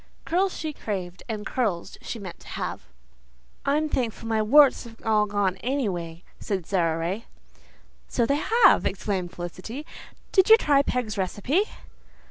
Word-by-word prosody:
Curls 370 Hz, +3 st, +1 dB
she 310 Hz, -1 st, -4 dB
craved 185 Hz, -8 st, -5 dB
and 215 Hz, -1 st, -4 dB
curls 210 Hz, -10 st, -2 dB
she -, -, -5 dB
meant 190 Hz, -5 st, -8 dB
to -, -, -16 dB
have. -, -, -5 dB, 0.8 s
"I'm 300 Hz, +2 st, +2 dB
thankful 235 Hz, -5 st, -2 dB
my 220 Hz, -1 st, +1 dB
warts 270 Hz, +4 st, +5 dB
have 230 Hz, -1 st, -11 dB
all 215 Hz, -1 st, +3 dB
gone, 200 Hz, -2 st, 0 dB
any 255 Hz, +5 st, -1 dB
way," 170 Hz, -2 st, -5 dB, 0.2 s
said 190 Hz, -5 st, -3 dB
Sara 165 Hz, -4 st, +1 dB
Ray. 185 Hz, +7 st, -3 dB, 0.8 s
"So 235 Hz, -, +1 dB
they 280 Hz, +4 st, +1 dB, 0.2 s
have," 370 Hz, -, +6 dB
exclaimed 190 Hz, -2 st, -2 dB
Felicity. 185 Hz, -, -7 dB, 0.5 s
"Did 380 Hz, 0 st, +4 dB
you 445 Hz, -, +10 dB
try 285 Hz, -9 st, +4 dB
Peg's 230 Hz, -6 st, -2 dB
recipe?" 245 Hz, -, +1 dB
215 Hz, 150 wpm, -25 LUFS, 185-275 Hz, 0.8 s, you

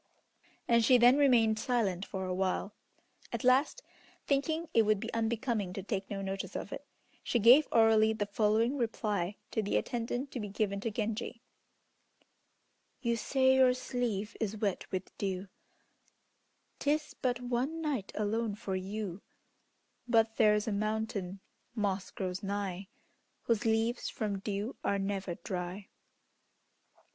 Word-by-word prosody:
And 235 Hz, -1 st, +4 dB
she 250 Hz, +3 st, +6 dB
then 245 Hz, +2 st, +7 dB
remained 230 Hz, -6 st, +4 dB
silent 215 Hz, -6 st, 0 dB
for 190 Hz, -1 st, -4 dB
a 185 Hz, -, -2 dB
while. 190 Hz, +2 st, -1 dB, 0.6 s
At -, -, -3 dB
last, 270 Hz, -, +3 dB, 0.4 s
thinking 315 Hz, +4 st, 0 dB
it 230 Hz, -, +6 dB
would 215 Hz, -2 st, +2 dB
be 225 Hz, +3 st, -6 dB
unbecoming 225 Hz, -3 st, -1 dB
to 195 Hz, -, -5 dB
take 195 Hz, -1 st, -3 dB
no 195 Hz, -1 st, -4 dB
notice 195 Hz, 0 st, -4 dB
of -, -, -4 dB
it, -, -, -8 dB, 0.3 s
she -, -, 0 dB
gave 245 Hz, +7 st, +7 dB
orally 220 Hz, -1 st, +5 dB
the 215 Hz, -2 st, -1 dB
following 220 Hz, +5 st, +1 dB
reply 210 Hz, -5 st, -1 dB, 0.2 s
to 220 Hz, -, 0 dB
the 205 Hz, -, 0 dB
attendant 245 Hz, +3 st, -2 dB
to 250 Hz, -, -4 dB
be 210 Hz, -, -4 dB
given 200 Hz, 0 st, -1 dB
to 225 Hz, -, -2 dB
Genji: 225 Hz, +2 st, -3 dB, 1.6 s
"You 235 Hz, -1 st, +2 dB
say 260 Hz, +3 st, +3 dB
your 260 Hz, -1 st, +5 dB
sleeve 235 Hz, -5 st, -2 dB
is 220 Hz, -1 st, -2 dB
wet 205 Hz, -3 st, -2 dB
with 185 Hz, -1 st, -4 dB
dew, 190 Hz, -1 st, -3 dB, 1.3 s
'Tis 300 Hz, +1 st, 0 dB
but 250 Hz, -3 st, 0 dB
one 250 Hz, +6 st, -2 dB
night 285 Hz, -11 st, -2 dB
alone 215 Hz, 0 st, -1 dB
for 205 Hz, -3 st, -4 dB
you, 195 Hz, 0 st, -4 dB, 0.9 s
But 225 Hz, -2 st, +3 dB
there's 210 Hz, 0 st, +4 dB
a -, -, 0 dB
mountain 210 Hz, -2 st, -2 dB, 0.3 s
moss 200 Hz, -3 st, -1 dB
grows 185 Hz, 0 st, -4 dB
nigh, 195 Hz, -2 st, -3 dB, 0.6 s
Whose 230 Hz, -2 st, 0 dB
leaves 225 Hz, +2 st, +1 dB
from 205 Hz, -3 st, -3 dB
dew 205 Hz, +4 st, -3 dB
are 200 Hz, -, +1 dB
never 195 Hz, -2 st, -2 dB
dry." 185 Hz, 0 st, -5 dB
220 Hz, 140 wpm, -32 LUFS, 200-240 Hz, 1.6 s, then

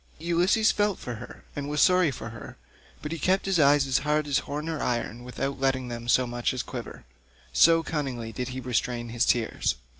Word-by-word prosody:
Ulysses 175 Hz, +7 st, +3 dB
felt 205 Hz, -2 st, +1 dB
for 125 Hz, -, -6 dB
her 120 Hz, +2 st, -11 dB
and 145 Hz, 0 st, -4 dB
was 150 Hz, 0 st, -1 dB
sorry 180 Hz, -1 st, +5 dB
for 115 Hz, -4 st, -6 dB
her, 115 Hz, -1 st, -10 dB, 0.5 s
but 150 Hz, -, -4 dB
he 165 Hz, -, -4 dB
kept 190 Hz, +5 st, +1 dB
his 195 Hz, -3 st, +1 dB
eyes 145 Hz, -1 st, +5 dB
as 135 Hz, -1 st, +2 dB
hard 150 Hz, +1 st, 0 dB
as 145 Hz, -2 st, +1 dB
horn 150 Hz, +2 st, -5 dB
or 160 Hz, -2 st, -3 dB
iron 120 Hz, -1 st, -2 dB
without 135 Hz, +2 st, -4 dB
letting 130 Hz, -2 st, 0 dB
them 120 Hz, 0 st, -6 dB
so 125 Hz, +2 st, +4 dB
much 120 Hz, +1 st, -2 dB
as 125 Hz, -, -2 dB
quiver, -, -, -8 dB, 0.5 s
so 165 Hz, -, +6 dB
cunningly 130 Hz, -8 st, -3 dB
did 125 Hz, +3 st, -4 dB
he 130 Hz, 0 st, -5 dB
restrain 120 Hz, -1 st, -2 dB
his 120 Hz, +1 st, 0 dB
tears. 115 Hz, -2 st, +1 dB
135 Hz, 205 wpm, -27 LUFS, 120-160 Hz, 0.5 s, so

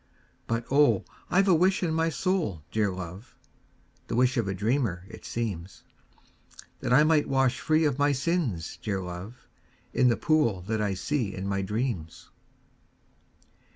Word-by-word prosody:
But, 115 Hz, 0 st, -1 dB
oh, 145 Hz, +1 st, +4 dB, 0.2 s
I 195 Hz, +2 st, +4 dB
've -, -, -2 dB
a 190 Hz, -, +6 dB
wish 185 Hz, +3 st, +3 dB
in 165 Hz, -2 st, 0 dB
my 165 Hz, +1 st, +1 dB
soul, 165 Hz, -, -1 dB
dear 110 Hz, -2 st, +1 dB
love, 90 Hz, +3 st, -8 dB, 0.7 s
(The -, -, -3 dB
wish 125 Hz, +1 st, +3 dB
of 115 Hz, -4 st, 0 dB
a 95 Hz, -, -1 dB
dreamer, 105 Hz, -4 st, 0 dB
it 115 Hz, -, -12 dB
seems,) 95 Hz, -6 st, -4 dB, 1.0 s
That -, -, -3 dB
I 140 Hz, +4 st, +7 dB
might 155 Hz, -1 st, +3 dB
wash 135 Hz, -2 st, +2 dB
free 155 Hz, +1 st, +2 dB
of 145 Hz, -2 st, 0 dB
my 145 Hz, 0 st, +4 dB
sins, 135 Hz, -, -1 dB
dear 100 Hz, -3 st, -2 dB
love, 90 Hz, +6 st, -8 dB, 0.5 s
In 125 Hz, -, +4 dB
the 120 Hz, -, +3 dB
pool 145 Hz, -12 st, +2 dB
that 110 Hz, +3 st, -2 dB
I 100 Hz, -2 st, 0 dB
see 115 Hz, +1 st, -2 dB
in 95 Hz, -, -5 dB
my 100 Hz, 0 st, 0 dB
dreams. 105 Hz, -5 st, -3 dB
120 Hz, 160 wpm, -27 LUFS, 95-150 Hz, 1.0 s, I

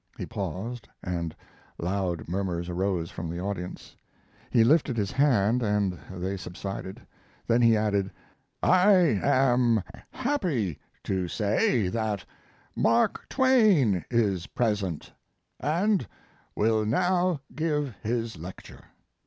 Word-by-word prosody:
He -, -, -4 dB
paused 115 Hz, +5 st, -5 dB, 0.2 s
and 85 Hz, -3 st, -3 dB, 0.4 s
loud 90 Hz, -3 st, -2 dB
murmurs 90 Hz, -1 st, -2 dB
arose 90 Hz, -2 st, -1 dB
from 85 Hz, -1 st, -5 dB
the 85 Hz, +1 st, -4 dB
audience. 95 Hz, -1 st, -5 dB, 0.5 s
He 115 Hz, -, +4 dB
lifted 140 Hz, -1 st, +3 dB
his 100 Hz, -2 st, -1 dB
hand 125 Hz, -4 st, +3 dB
and 105 Hz, -5 st, 0 dB
they 95 Hz, +1 st, -4 dB
subsided. 95 Hz, +2 st, -7 dB, 0.4 s
Then 120 Hz, +1 st, +3 dB
he 115 Hz, -2 st, +5 dB
added, 100 Hz, -2 st, 0 dB, 0.5 s
"I 185 Hz, +3 st, +6 dB, 0.3 s
am 125 Hz, -5 st, +3 dB, 0.3 s
happy 175 Hz, -, -1 dB, 0.2 s
to 95 Hz, -2 st, -1 dB
say 105 Hz, +2 st, +1 dB
that 110 Hz, -2 st, -2 dB, 0.5 s
Mark 115 Hz, +1 st, +2 dB
Twain 210 Hz, -, +4 dB
is 100 Hz, -7 st, +1 dB
present, 100 Hz, -9 st, -2 dB, 0.5 s
and 180 Hz, -, +1 dB, 0.5 s
will 110 Hz, 0 st, +2 dB
now 175 Hz, +7 st, +1 dB
give 150 Hz, -4 st, -1 dB
his 115 Hz, -4 st, -2 dB
lecture." 90 Hz, +3 st, -10 dB
110 Hz, 110 wpm, -27 LUFS, 95-130 Hz, 0.5 s, I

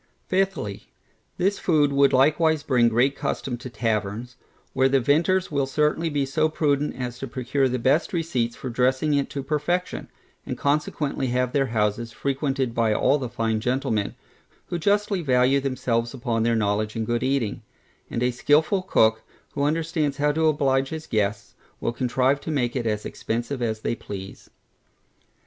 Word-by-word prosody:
Fifthly, 190 Hz, -, -1 dB, 0.5 s
This 195 Hz, +3 st, +1 dB
food 150 Hz, -5 st, +2 dB
would 140 Hz, 0 st, +4 dB
likewise 155 Hz, +3 st, +3 dB
bring 120 Hz, -4 st, +3 dB
great 125 Hz, +5 st, +2 dB
custom 125 Hz, -, -3 dB
to 125 Hz, +2 st, -8 dB
taverns, 115 Hz, +1 st, -2 dB, 0.4 s
where 130 Hz, 0 st, +3 dB
the 135 Hz, 0 st, +3 dB
vintners 165 Hz, +9 st, +2 dB
will 140 Hz, -2 st, 0 dB
certainly 150 Hz, +4 st, +1 dB
be 145 Hz, -2 st, 0 dB
so 155 Hz, +4 st, +1 dB
prudent 150 Hz, -2 st, 0 dB
as 125 Hz, -1 st, -5 dB
to 135 Hz, -, -5 dB
procure 130 Hz, +2 st, 0 dB
the 125 Hz, -, -1 dB
best 135 Hz, +7 st, +2 dB
receipts 130 Hz, -9 st, -1 dB
for 130 Hz, -, -6 dB
dressing 130 Hz, +5 st, +1 dB
it 140 Hz, -1 st, +1 dB
to 140 Hz, -, -4 dB
perfection; 155 Hz, +6 st, -2 dB, 0.4 s
and -, -, -5 dB
consequently 145 Hz, -1 st, -1 dB
have 125 Hz, 0 st, 0 dB
their 135 Hz, -2 st, +2 dB
houses 110 Hz, 0 st, -1 dB
frequented 135 Hz, -1 st, -1 dB
by 115 Hz, -2 st, +2 dB
all 140 Hz, +7 st, +3 dB
the 125 Hz, -3 st, -4 dB
fine 115 Hz, -1 st, -1 dB
gentlemen, 125 Hz, -3 st, -1 dB, 0.5 s
who 175 Hz, -, -2 dB
justly 200 Hz, +1 st, +1 dB
value 130 Hz, -1 st, +3 dB
themselves 125 Hz, -3 st, -1 dB
upon 120 Hz, -2 st, -1 dB
their 115 Hz, +1 st, +2 dB
knowledge 105 Hz, 0 st, 0 dB
in 115 Hz, -1 st, -2 dB
good 120 Hz, +1 st, -1 dB
eating; 130 Hz, -4 st, -1 dB, 0.5 s
and 120 Hz, -, -2 dB
a 125 Hz, -, +2 dB
skilful 150 Hz, +9 st, +2 dB
cook, 110 Hz, -, +3 dB, 0.3 s
who 140 Hz, -, -3 dB
understands 155 Hz, -1 st, 0 dB
how 150 Hz, 0 st, +2 dB
to 160 Hz, +1 st, +1 dB
oblige 135 Hz, -3 st, +2 dB
his 160 Hz, 0 st, -6 dB
guests, 105 Hz, -2 st, -1 dB, 0.3 s
will 115 Hz, -, -2 dB
contrive 130 Hz, +3 st, +1 dB
to -, -, -6 dB
make 130 Hz, -5 st, 0 dB
it 120 Hz, -3 st, -1 dB
as 105 Hz, -1 st, -2 dB
expensive 120 Hz, +4 st, -3 dB
as 110 Hz, -2 st, -1 dB
they -, -, -1 dB
please. 95 Hz, -4 st, -8 dB
135 Hz, 165 wpm, -24 LUFS, 120-150 Hz, 0.5 s, would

